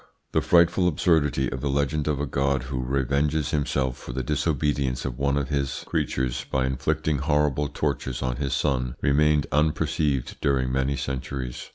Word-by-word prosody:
The - - +2
frightful 85 +1 +4
absurdity 75 -5 +2
of 65 - -4
the 70 - -1
legend 70 +2 0
of 75 -3 0
a 70 - 0
God 70 -1 0
who 65 -1 -3
revenges 70 +3 0
himself 70 -4 0
for - - -8
the 65 +1 -2
disobedience 70 -2 0
of 65 -1 -4
one 70 +1 +1
of 70 -1 -1
his 70 -2 -2
creatures 65 -1 -1
by 65 -1 +1
inflicting 75 +3 0
horrible 75 0 +1
tortures 70 -3 -2
on 65 -1 -1
his 70 -2 -2
son 65 -4 0
remained 75 +1 +3
unperceived 75 -2 0
during 65 -2 +1
many 65 +1 0
centuries. 65 -1 -4
70 Hz, 165 wpm, -25 LUFS, 65-75 Hz, -, frightful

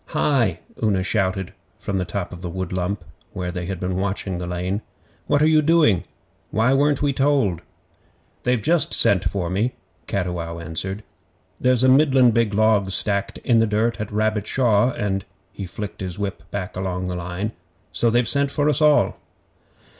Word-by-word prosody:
'HI!' 115 - +1 0.2
Una 100 -4 +2
shouted 95 -2 -1 0.2
from 100 -2 -3
the 90 - -1
top 90 +1 -4
of 90 - -9
the 90 - -4
wood 95 +1 -4
lump, 95 +2 -2 0.3
where 90 -1 -3
they 90 -1 -5
had 95 -2 -4
been 90 0 -2
watching 95 -1 -2
the 90 - -4
lane. 90 +4 -2 0.5
'What 145 +1 +3
are - - +5
you 155 -1 +5
doing? 150 - +3 0.4
Why 115 +4 +2
weren't 145 +1 +2
we 140 -1 +2
told?' 135 - +1 0.8
'They've 125 -3 0
just 170 0 +2
sent 100 -2 +4
for 95 -3 -1
me,' 110 +7 0 0.3
Cattiwow 90 -3 -3
answered. 85 +5 -4 0.6
'There's 125 -1 +3
a - - +5
middlin' 130 -2 +5
big 110 -2 +1
log 110 -2 +3
stacked 100 +1 0
in 115 -2 +3
the 115 - +3
dirt 110 +2 0
at 105 - -4
Rabbit 110 0 0
Shaw, 120 -3 +3
and' 100 -5 -2 0.3
he 100 -1 -6
flicked 100 +4 -7
his 90 -2 -5
whip 95 -4 -5
back 95 -1 -5
along 95 -1 -3
the 90 - -3
line 90 +5 -4 0.4
'so 120 - +1
they've 120 +1 +2
sent 140 -1 +2
for 145 +1 +1
us 150 +1 +1
all. 150 -1 +4
100 Hz, 175 wpm, -22 LUFS, 90-125 Hz, 0.8 s, are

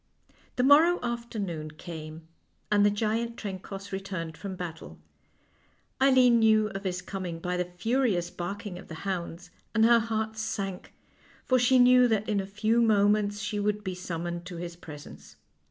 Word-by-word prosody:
The 250 - +1
morrow 315 +6 +6
afternoon 215 -10 -4
came, 155 0 -9 0.4
and 205 -1 +4
the 205 - +6
giant 225 +3 -1
Trencoss 195 0 -7
returned 185 -4 -5
from 195 +1 -6
battle. 170 -3 -7 1.0
Eileen 255 -3 +6
knew 215 -1 +4
of 195 0 -7
his 180 -1 -2
coming 185 -4 -5
by 180 +2 -3
the 180 0 0
furious 215 -5 +1
barking 180 +1 -5
of - - -13
the 160 - -8
hounds, 175 -2 -4 0.2
and 225 0 +5
her 235 0 +6
heart 220 -1 -2
sank, 195 -3 -4 0.5
for 255 -1 +3
she 245 +2 +4
knew 250 0 +6
that 215 -2 0
in 210 -2 +1
a 190 - -3
few 215 +4 +1
moments 205 -1 +3
she 205 0 -2
would 210 0 -1
be 190 -2 -3
summoned 175 -1 -5
to 180 - -7
his 170 0 -6
presence. 150 -4 -12
200 Hz, 160 wpm, -28 LUFS, 180-225 Hz, 1.0 s, morrow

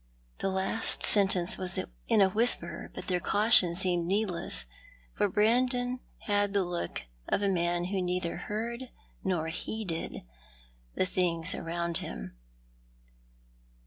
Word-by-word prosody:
The - - -1
last 190 +4 0
sentence 190 -4 +3
was 185 -1 -1 0.3
in 210 - +3
a 190 - +5
whisper, 230 +5 +1
but - - -7
their 180 -1 0
caution 200 -2 +5
seemed 175 -2 0
needless, 190 -3 +1 0.5
for 205 -1 0
Brandon 245 +4 +1 0.2
had 205 -1 0
the 200 -1 +2
look 175 - -4 0.3
of 205 - 0
a - - +2
man 175 -2 0
who 190 +1 -2
neither 180 -1 -2
heard 235 +6 -5 0.3
nor 175 -4 -1
heeded 180 0 -5 0.7
the - - +1
things 170 -3 +3
around 170 0 -3
him. - - -7
190 Hz, 125 wpm, -29 LUFS, 175-210 Hz, 0.7 s, a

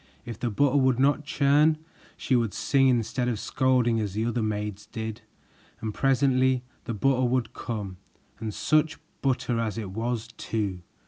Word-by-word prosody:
If 115 -3 -7
the 120 - -1
butter 140 +6 +2
would 130 -3 +3
not 145 +2 +2
churn, 150 +2 +3 0.4
she 130 - +1
would 115 -4 +1
sing 135 -1 +3
instead 125 0 +1
of 115 -4 -1
scolding 125 -3 +2
as 105 -3 -2
the 110 +1 0
other 120 0 0
maids 105 -1 -3
did, 110 -1 -5 0.6
and 110 -1 -4
presently 130 -1 +2 0.2
the 115 - -3
butter 130 +3 +2
would 125 -1 0
come, 105 -5 -5 0.4
and 110 -1 -3
such 155 +7 +1 0.2
butter 125 -3 0
as 115 -1 -2
it 105 -4 -4
was 115 +2 -3
too! 100 -5 -2
120 Hz, 165 wpm, -27 LUFS, 110-130 Hz, 0.6 s, would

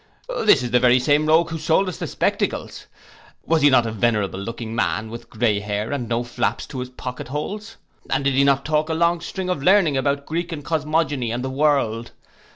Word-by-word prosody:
This 145 -11 +5
is 120 - -4
the 125 - +4
very 125 0 +5
same 145 +4 +2
rogue 165 +2 +3
who 160 - -4
sold 160 +5 +2
us 180 - -4
the - - -3
spectacles. - - -2 0.6
Was 165 -1 +2
he 145 - +6
not 130 -3 +4
a 115 - -2
venerable 105 -3 0
looking 115 +2 -6
man, 110 -1 -1
with 115 - -9
grey 110 -2 +1
hair, 105 +2 -3
and 125 -5 -3
no 120 +1 0
flaps 120 0 -2
to 135 - -6
his 125 0 -5
pocket 125 -1 -7
holes? 205 - -5 0.3
And 135 +1 0
did 140 0 +2
he 135 +1 +4
not 140 -1 +2
talk 155 0 0
a 160 - 0
long 170 +1 +2
string 185 +2 -5
of 180 -6 -1
learning 175 -3 +4
about 140 +1 0
Greek 170 +2 -3
and 145 -3 -6
cosmogony, 155 -5 0
and 120 +2 -3
the 130 - -3
world? 130 -5 0
140 Hz, 215 wpm, -22 LUFS, 120-160 Hz, 0.6 s, he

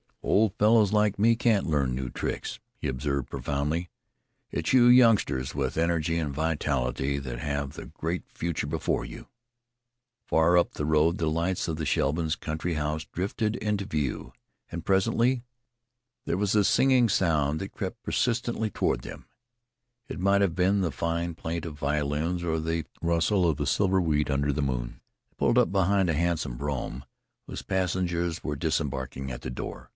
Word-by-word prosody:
"Old 105 -2 +3
fellows 105 -1 +4
like 105 -1 +2
me 115 +2 +5
can't 115 -4 +2
learn 70 -5 +1
new 65 0 -3
tricks," - - -4 0.2
he - - -4
observed 70 0 -2
profoundly. 75 +5 -2 0.6
"It's - - -1
you 125 -2 +7
youngsters 115 - +4
with 65 -1 -2
energy 85 0 +1
and 75 -4 -2
vitality 70 -3 -1
that 65 -3 -6
have 70 0 -3
the - - -8
great 85 +1 -4
future 85 -2 -3
before - - -1
you." - - -10 1.0
Far 80 +2 +4
up 85 - +2
the 75 - -3
road 80 +3 +3
the 80 -2 0
lights 85 +4 -1
of 80 -2 -2
the 80 - -3
Shevlins' 80 +4 +1
country 80 +2 -3
house 75 +1 -2
drifted 105 +4 -2
into 105 -2 -1
view, 75 - -3 0.4
and 85 -1 -6
presently 115 +6 +2 0.8
there - - 0
was 100 +1 +1
a 105 - +5
sighing 130 +2 +4
sound 80 -6 +1
that 95 - -5
crept 110 +4 -5
persistently 120 -2 0
toward - - 0
them - - -9 0.8
it - - -6
might 100 +2 +3
have 95 -5 +1
been 95 +2 +2
the 85 -4 0
fine 85 +5 -2
plaint 80 0 -4
of 75 -3 -7
violins 75 +4 -1
or 80 -1 0
the 80 0 -2 0.2
rustle 85 +3 +2
of 80 -4 +1
the - - -2
silver 95 -2 +2
wheat 75 -3 +1
under 70 +1 +1
the 75 +2 -1
moon. - - -3 0.3
They - - -37
pulled - - +2
up - - +2
behind 95 -1 +2
a - - +2
handsome 80 -6 -1
brougham 70 -1 -4 0.4
whose - - -6
passengers 90 -2 -1
were 75 - -2
disembarking 70 -4 -2
at - - -6
the 65 - -5
door. 60 - -7
85 Hz, 170 wpm, -27 LUFS, 75-95 Hz, 1.0 s, you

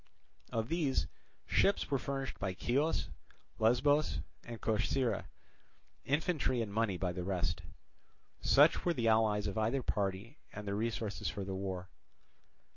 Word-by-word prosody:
Of 115 0 -1
these, 160 -5 +1 0.4
ships 200 -6 +2
were 140 - +2
furnished 135 +1 -4
by 95 -2 -2
Chios, 140 +7 +1 0.5
Lesbos, 130 +7 +3 0.2
and 120 -1 -7
Corcyra, 115 +3 0 0.8
infantry 145 -3 +1
and 110 -3 -2
money 110 -4 +1
by 90 0 -1
the 90 0 -4
rest. 90 -3 -1 0.8
Such - - +5
were 175 -1 +1
the 120 -4 0
allies 110 -2 +3
of 100 +1 -1
either 120 +5 +1
party 100 +7 -2
and 105 0 -7
their 100 - -1
resources 110 -1 -2
for 100 - -4
the 95 0 -4
war. 95 -1 -4
110 Hz, 135 wpm, -34 LUFS, 100-135 Hz, 0.8 s, Such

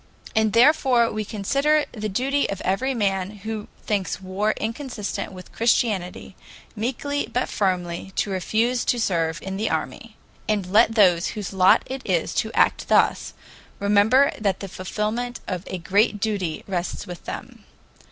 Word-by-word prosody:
And 220 -1 +2
therefore 245 -2 +4
we 215 - -2
consider 275 +9 +1
it 300 - -1
the 215 -2 -4
duty 270 +8 0
of 195 - -3
every 255 +8 0
man 195 -4 0 0.2
who 220 -1 -4 0.2
thinks 200 -5 -1
war 190 +3 -1
inconsistent 230 -2 -4
with 185 -1 -11
Christianity, 205 -6 0 0.4
meekly 270 +6 -2
but 250 - 0
firmly 180 -2 -1
to 205 - 0
refuse 225 +6 0
to 245 - +1
serve 165 -6 0
in 190 0 -4
the 220 +2 -1
army. 215 +7 -4 0.3
And 210 -3 +1
let 215 +4 +4
those 180 -5 +4
whose 200 -2 -5
lot 190 -1 +5
it 265 0 -5
is 175 -4 0
to 220 - -7
act - - +2
thus, - - +2 0.4
remember 210 +7 +4
that 200 -4 0
the 195 - -6
fulfillment 215 +6 -3
of 180 -1 -4
a 185 - -4
great 200 +5 +2
duty 195 -7 -2
rests 185 -2 -3
with 180 -1 -9
them. - - -8
210 Hz, 155 wpm, -23 LUFS, 190-235 Hz, 0.4 s, lot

